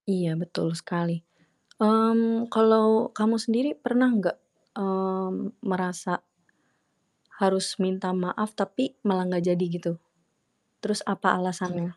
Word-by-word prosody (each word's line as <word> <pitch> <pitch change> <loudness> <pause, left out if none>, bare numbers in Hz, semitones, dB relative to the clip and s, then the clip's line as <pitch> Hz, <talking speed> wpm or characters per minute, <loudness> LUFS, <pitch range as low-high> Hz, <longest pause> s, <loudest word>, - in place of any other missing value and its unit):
Iya 180 -4 0
betul 170 -1 -3
sekali. 170 0 -3 0.6
Mmm, 230 +1 +3
kalau 220 +1 +5
kamu 215 +2 +2
sendiri 230 +5 +1
pernah 250 -1 +3
gak, 180 -4 0 0.4
mmm, 190 +2 -3
merasa 180 -3 -2 1.2
harus 190 -1 +1
minta 185 0 -1
maaf, 185 +4 -2
tapi 215 +6 -3
malah 185 -2 +2
gak 175 -1 0
jadi 180 +1 0
gitu? 170 -1 -3 0.9
Terus 210 0 -1
apa 195 -2 +2
alasannya? 180 -1 -4
190 Hz, 110 wpm, -26 LUFS, 180-220 Hz, 1.2 s, kalau